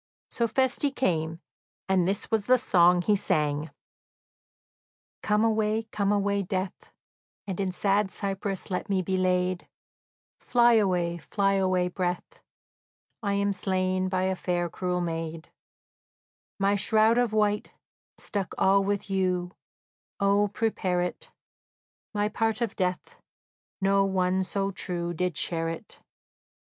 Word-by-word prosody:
So 235 - 0
Feste 260 +4 +1
came, 165 -6 -1 0.5
and 185 -2 +2
this 195 +1 -2
was 220 -2 +1
the 255 0 +6
song 180 -5 +4
he 210 - +3
sang: 150 -5 0 1.5
"Come 210 0 +2
away, 220 0 +1
come 200 -1 0
away, 200 0 +1
death, 185 0 -4 0.5
And 190 -2 -5
in 190 -2 0
sad 200 +2 +1
cypress 195 0 -4
let 180 +4 -3
me 190 -2 +1
be 190 +2 -1
laid; 185 -1 0 0.7
Fly 240 -1 +4
away, 180 -5 +1
fly 195 +4 0
away, 185 -2 +2
breath; 180 0 -4 0.8
I 200 -2 -1
am 200 0 +1
slain 185 -1 0
by 185 0 0
a 190 0 +1
fair, 175 -2 -2
cruel 180 -1 -2
maid; 165 -1 -4 1.1
My 195 0 +2
shroud 220 +3 +3
of 245 -3 +1
white, 210 -1 +1 0.5
stuck 195 -4 -4
all 195 +1 +4
with 200 +1 -1
yew, 185 -2 0 0.7
O, 200 +1 +3
prepare 195 -4 0
it! 180 - -5 0.8
My 205 -1 0
part 225 +1 0
of 235 -4 -2
death, 180 -1 -3 0.6
no 195 0 +3
one 190 -1 +1
so 195 +1 -2
true 175 -2 -3
Did 180 -2 -2
share 165 -1 -1
it. 165 - -8
190 Hz, 130 wpm, -27 LUFS, 180-205 Hz, 1.5 s, the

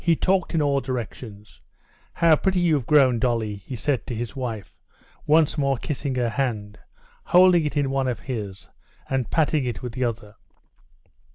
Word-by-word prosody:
he 170 -1 +3
talked 185 0 0
in 155 - +2
all 140 -1 +1
directions. 115 -4 -7 0.5
"How 165 -2 +4
pretty 190 +3 0
you've 155 -8 +1
grown, 130 -5 +4
Dolly," 115 -5 -1
he 100 +6 -8
said 130 -1 -2
to 120 - -4
his 115 +1 -5
wife, 115 -7 -5 0.5
once 155 0 +3
more 140 -2 +1
kissing 140 +1 -4
her 120 -2 0
hand, 105 -4 -3 0.4
holding 180 -2 +5
it 150 0 -3
in 140 -2 +1
one 135 -1 0
of 120 -4 -3
his, 105 -7 -6 0.4
and 130 -3 -2
patting 155 -2 +1
it 120 -4 -4
with 125 -2 -5
the 130 +1 -1
other. 110 -3 -5
130 Hz, 170 wpm, -24 LUFS, 115-150 Hz, 0.5 s, holding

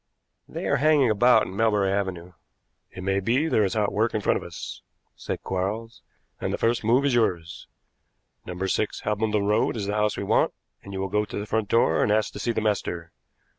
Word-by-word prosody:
"They - - -6
are - - +2
hanging 145 -4 +4
about 110 +1 +5
in 95 - -8
Melbury 105 -3 +2
Avenue." 95 -3 -3 0.6
"It 95 - -9
may 95 +1 +1
be 125 +10 +1
there 110 - +2
is 95 0 -1
hot 105 -2 +1
work 110 +2 +1
in 110 - 0
front - - +2
of - - -6
us," - - -8 0.3
said - - -5
Quarles, 105 +5 -3 0.4
"and - - -2
the - - -1
first 115 0 +1
move 120 +6 +3
is 140 - +2
yours. 85 -8 -1 0.8
No. 90 0 -7
6 105 +2 -1
Hambledon 105 -1 0
Road 105 +3 +1
is 105 - -3
the 100 - -2
house 105 0 0
we - - -3
want, 100 - +2 0.3
and 100 - -11
you 95 - -5
will 95 - -1
go 105 +2 +1
to 105 - -7
the 100 - -3
front 110 -1 -1
door 100 -9 +3
and 105 - +2
ask 105 -1 +1
to - - -7
see 120 - 0
the 110 - -1
master. 90 -5 -2
105 Hz, 215 wpm, -25 LUFS, 95-115 Hz, 0.8 s, about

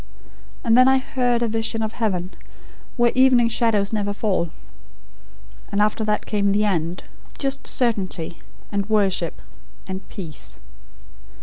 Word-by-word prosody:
And 230 -1 +4
then, 255 +1 +7
I 265 0 +5
HEARD 245 -2 0
a - - +1
vision 225 0 -1
of 215 - -2
heaven, 185 -6 -2 0.7
where 240 -1 +4
evening 255 -2 +5
shadows 220 -3 +2
never 205 -1 0
fall: 195 -5 0 1.2
And 200 - 0
after 215 +1 +2
that 210 0 0
came 200 -2 +1
the 210 +1 +2
end; 170 -3 -1 0.3
just 275 0 -2
certainty, 190 -9 -1 0.3
and 200 0 -2
worship, 195 -5 +1 0.5
and 190 0 -6
peace. 155 - -7
215 Hz, 130 wpm, -22 LUFS, 195-235 Hz, 1.2 s, then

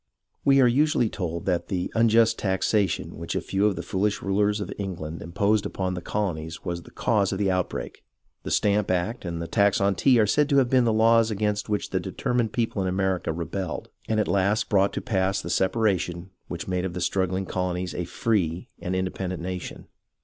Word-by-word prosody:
We 135 -1 +5
are 125 - +6
usually 140 -1 +2
told 85 -5 -4
that 90 -2 0
the 90 -2 -2
unjust 115 0 +4
taxation 95 0 0
which 85 - -4
a - - +2
few 100 +2 +1
of 100 - 0
the - - -5
foolish 100 +2 -1
rulers 105 +2 +1
of 100 - -4
England 85 -5 -5
imposed 100 +5 +1
upon 95 -1 -2
the 90 - -4
colo 100 0 -1
nies 80 +2 -8
was 85 -1 -3
the - - -14
cause 105 -4 +1
of 95 - -2
the 100 -1 +1
outbreak. 90 -1 -3 0.4
The - - -6
Stamp 105 -1 +2
Act 95 +5 -1
and 85 -1 -3
the 85 - -3
tax 100 +3 +2
on 100 0 +2
tea 125 +4 +4
are 110 - +5
said 145 +8 +2
to 140 - +3
have 130 -3 +3
been 130 -2 +4
the 115 - +3
laws 115 +1 +4
against 105 0 -1
which 105 -1 -1
the - - +1
determined 120 -3 -1
people 115 -4 -1
in 95 - 0
America 95 -2 0
rebelled 85 +1 -4 0.2
and 110 -1 +2
at 105 - +1
last 100 +2 +1
brought 100 -1 +3
to - - -3
pass 95 -2 0
the 85 - -5
separation 95 -3 0 0.2
which 85 0 -6
made 90 -1 -1
of 95 -2 -3
the - - -2
strugghng 95 +1 0
colonies 90 0 -2
a 90 - -3
free 90 -3 -1
and 90 +1 -3
independent 95 -1 -3
nation. 90 -1 -6
95 Hz, 210 wpm, -25 LUFS, 90-110 Hz, 0.4 s, are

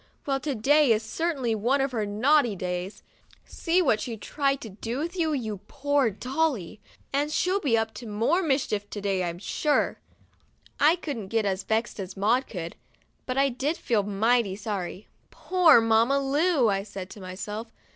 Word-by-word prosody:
Well, 275 -2 0
to 280 0 -3
day 285 +4 +4
is 220 0 +2
certainly 270 -1 -1
one 240 +6 +1
of 270 0 0
her 220 -4 -2
naughty 240 +2 +3
days. 180 +1 -4 0.4
See 355 +2 +1
what 220 -8 +2
she 230 -2 -4
tried 275 +4 -1
to 225 - -7
do 235 - -3
to 345 - -16
you, 320 -2 +1
you 220 -8 -3
poor 285 -3 +1
Dolly. 250 - -2 0.3
And 290 +2 0
she'll 365 +5 +1
be 255 -11 +2
up 225 0 -1
to 235 - -8
more 230 - +1
mischief 265 - -1
to 210 - -5
day, 195 -2 0
I'm 170 -1 -3
sure." 290 - 0 0.8
I 305 +4 +5
couldn't 280 - -5
get 225 +1 0
as 195 -1 0
vexed 220 +2 -1
as 190 -1 -6
Maud 235 +7 +2
could, 170 -4 -6 0.5
but 255 0 -2
I 275 0 +4
did 275 +6 -2
feel 225 -4 +1
mighty 205 +1 +1
sorry. 200 -2 -5 0.2
"Poor 360 -8 +5
Mamma 225 +4 +3
Lu!" 285 0 +2
I 195 -2 +1
said 195 -2 -8
to 205 - -10
myself. 210 +5 -6
235 Hz, 175 wpm, -26 LUFS, 205-285 Hz, 0.8 s, I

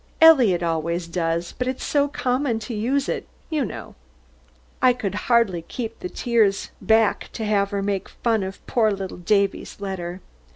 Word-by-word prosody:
Eliot 250 - +6
always 170 +1 -1
does, 170 0 -2
but 250 - 0
it's 260 0 -3
so 285 -1 +2
common 250 -2 0
to 225 +2 -6
use 260 +6 0
it, - - -3 0.2
you 305 -3 +1
know." - - -7 0.9
I 255 -1 +6
could 210 -6 -3 0.2
hardly 230 -8 +3
keep 225 +6 -6
the 180 - -5
tears 220 -4 +1
back 220 -1 +2
to 220 - -4
have 200 -2 +2
her 200 -1 -2
make 200 -1 -2
fun 225 -3 0
of 190 0 -6
poor 225 -3 +2
little 195 -2 -4
Davy's 200 +3 0
letter. 185 -3 -4
210 Hz, 165 wpm, -23 LUFS, 185-245 Hz, 0.9 s, Eliot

